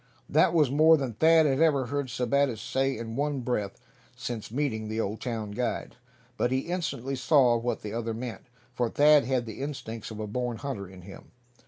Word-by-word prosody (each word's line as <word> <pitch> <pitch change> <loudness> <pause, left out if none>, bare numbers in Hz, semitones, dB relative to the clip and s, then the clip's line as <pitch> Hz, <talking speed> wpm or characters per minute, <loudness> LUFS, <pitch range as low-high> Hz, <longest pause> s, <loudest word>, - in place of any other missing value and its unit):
That - - +4
was 150 -6 +4
more 160 +3 +6
than 135 -5 -3
Thad 160 +6 +5
had 135 0 +1
ever 145 -5 +3
heard 140 +2 -2
Sebattis 125 0 0
say 135 +2 -1
in 115 0 -6
one 145 0 -1
breath 105 -5 -2 0.4
since 115 -3 -5
meeting 115 -4 -2
the 110 +1 -3
Old 105 0 -2
town 110 -4 -4
guide. 120 +3 -3 0.4
But 120 - +1
he 130 0 +1
instantly 140 -7 -3
saw 130 -2 +4
what 120 +1 -2
the 105 0 -5
other 115 -1 -3
meant, 120 +1 -7 0.3
for 120 -2 0
Thad 150 0 +5
had 130 -1 0
the 110 +2 -7
instincts 125 -6 -5
of 110 -1 -8
a 110 - -3
born 120 +2 -3
hunter 125 -9 -5
in 95 -1 -13
him. 95 - -12
125 Hz, 195 wpm, -28 LUFS, 115-140 Hz, 0.4 s, more